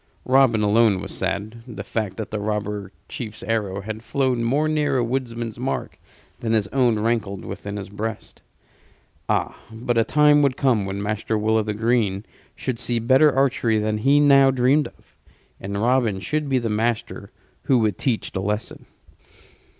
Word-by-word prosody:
Robin 130 -4 +4
alone 105 -1 +3
was - - -7
sad; 110 +3 -3
the 110 -5 -7
fact 105 -2 -3
that 110 - -5
the 105 - -2
robber 105 -2 -3 0.2
chief's 110 -3 -7
arrow 100 -4 -2
had 110 +2 -6
flown 130 -1 0
more 140 +6 +1
near 150 -3 +1
a 125 - +2
woodman's 115 -2 -3
mark 130 +2 -3 0.4
than 115 -1 -1
his 110 -2 +2
own 125 -3 +2
rankled 105 -3 -1
within 100 0 -6
his 100 - -6
breast. 105 +2 -6 0.9
Ah, - - 0 0.2
but 115 +1 -1
a - - +4
time 150 +3 +4
would 140 -3 +1
come 115 -8 +2
when 100 +1 -4
Master 105 +1 -1
Will 110 +1 +1
o' 110 - +2
th' 105 -1 -4
Green 110 -3 +1 0.3
should 125 -3 -3
see 120 - 0
better 130 +6 +4
archery 130 -4 +1
than 105 0 -1
he 140 +6 +4
now 140 -2 +6
dreamed 135 +3 +2
of. - - -22 0.4
And 100 +1 -4
Robin 115 -3 +1
should 150 +10 -2
be 135 - +2
the 120 -2 -1
master 110 +1 -2 0.4
who 130 - +4
would 110 -3 0
teach 125 -5 -1
the 95 - -3
lesson. 105 +2 -4
115 Hz, 175 wpm, -22 LUFS, 105-130 Hz, 0.9 s, now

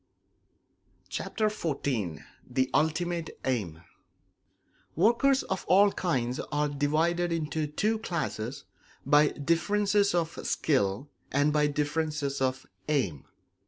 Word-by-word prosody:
Chapter 220 - -2
XIV 130 - -2 0.3
The 130 +1 0
Ultimate 165 +2 0
Aim 95 -11 -2 1.1
Workers 240 - +3
of 190 - -3
all 200 +2 +6
kinds 130 -10 -1
are 150 0 +1
divided 160 +5 +1
into 155 -1 -1
two 215 +9 0
classes 140 - -3 0.4
by 145 +2 +5
differences 200 +7 +1
of 165 -1 -1
skill 130 -3 0 0.2
and 145 +2 +2
by 150 -1 +3
differences 150 -1 -1
of 130 0 0 0.2
aim. 110 - 0
150 Hz, 100 wpm, -28 LUFS, 135-175 Hz, 1.1 s, all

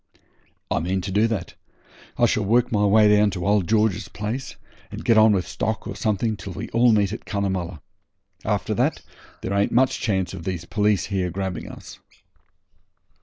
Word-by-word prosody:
'I - - +2
mean 95 +3 -1
to 95 +2 -5
do 105 +4 +3
that. 100 -6 -4 0.6
I - - +4
shall - - +1
work 120 +4 +2
my 105 -2 +2
way 105 +1 +5
down 105 0 +4
to 90 -3 -4
old 100 -3 +2
George's 110 -2 +1
place, 115 +5 -5 0.3
and - - -8
get 115 - +4
on 110 0 +6
with 95 -3 0
stock 105 +4 -3
or - - -5
something 110 0 0
till 100 -2 -8
we 100 +6 -6
all 120 +1 +4
meet 105 -2 +2
at 115 - -7
Cunnamulla. 95 -5 -3 0.6
After - - -1
that - - 0 0.4
there 100 - -2
ain't 100 0 +1
much 130 +2 +2
chance 95 -6 -1
of 90 -3 -7
these 90 -2 -4
police 105 0 +1
here 95 -3 -1
grabbing 95 0 -4
us.' - - -11
100 Hz, 180 wpm, -23 LUFS, 95-110 Hz, 0.6 s, on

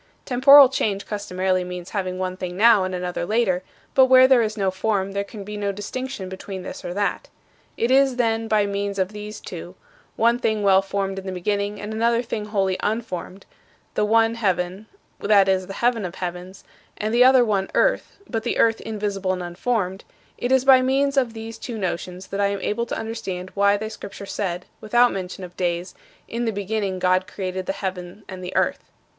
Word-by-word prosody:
Temporal 275 +2 +8
change 205 -6 -1
customarily 185 -3 -1
means 180 0 -7
having 185 -3 -2
one 185 0 -3
thing 180 -1 -6
now 220 -2 +6
and 185 0 -3
another 180 -1 -3
later; 185 -2 +1 0.3
but 265 -1 +6
where 260 0 +7
there 260 -2 +5
is 215 -1 -2
no 195 -2 +1
form 195 0 -1
there 200 0 -2
can 200 0 -9
be 210 +1 -7
no 200 -1 -1
distinction 205 +1 -5
between 190 0 -7
this - - -8
or - - -4
that. 205 0 -1 0.5
It 235 +2 +1
is, 270 -1 +4
then, 225 -2 0
by 215 -2 +2
means 200 0 -3
of 190 -1 0
these 210 0 -8
two 175 0 -9 0.4
one 235 +2 +3
thing 220 -3 0
well 195 -1 +5
formed 195 0 -3
in 190 - -9
the - - -2
beginning 200 +3 -2
and 210 +1 -5
another 230 +2 +1
thing 215 -3 -4
wholly 195 -3 0
unformed, 210 -4 -4 0.5
the - - +1
one 225 +1 +3
heaven 190 -2 -1 0.3
(that 200 -2 +4
is, 190 -1 +1
the 195 - -6
heaven 235 0 +1
of 180 0 -5
heavens) 180 +1 -6 0.3
and 215 +1 -2
the 240 +1 +6
other 255 -1 +6
one 195 -3 0
earth - - +1
(but 225 -2 -2
the 235 - -2
earth 225 -1 +3
invisible 200 -3 -2
and 180 -1 -4
unformed) 190 +1 -2 0.3
it 245 - -3
is 265 0 +3
by 265 -1 +7
means 275 +2 +1
of 250 -4 +1
these 225 0 -8
two 235 -1 -6
notions 185 -1 -4
that 195 +1 -3
I 200 - +3
am 200 -1 -3
able 235 +5 -1
to - - -3
understand 220 -5 -5
why 200 0 +3
thy 215 +1 -5
Scripture 200 -2 -9
said, 185 -3 -3 0.2
without 240 +3 +4
mention 190 0 -5
of 180 -1 -9
days, 175 0 -2 0.3
"In 235 +1 -3
the 225 - +1
beginning 200 -1 -2
God 185 0 +2
created 185 -2 -5
the - - 0
heaven 185 +1 -6
and 185 -1 -8
the 180 - -6
earth." - - +1
200 Hz, 200 wpm, -23 LUFS, 185-225 Hz, 0.5 s, Temporal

